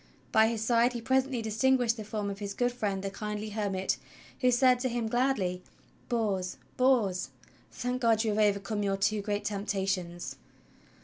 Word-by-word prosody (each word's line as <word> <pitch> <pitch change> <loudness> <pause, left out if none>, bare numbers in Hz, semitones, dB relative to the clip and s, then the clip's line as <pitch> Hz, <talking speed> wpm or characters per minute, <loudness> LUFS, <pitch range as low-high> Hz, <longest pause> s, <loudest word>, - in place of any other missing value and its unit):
By 220 0 +5
his 225 -1 -2
side 235 +1 +3
he 240 - -3
presently 260 0 +1
distinguished 230 +2 +2
the 220 - -6
form 210 -1 -3
of 195 - -7
his 200 -1 -5
good 245 0 +1
friend, 205 -5 -2
the 195 - -3
kindly 210 +1 -4
hermit, 200 -3 -1 0.4
who 255 - +4
said 250 0 +4
to 255 0 0
him 235 -1 -1
gladly: 220 -7 0 0.5
"Bors, 200 -6 -1 0.2
Bors, 235 -8 +2 0.4
thank 250 +1 -3
God 225 -2 +3
you 220 - +1
have 210 - 0
overcome 205 +1 0
your 195 -1 0
two 205 +2 +1
great 205 0 -2
temptations! 195 -4 -2
215 Hz, 170 wpm, -30 LUFS, 200-245 Hz, 0.5 s, By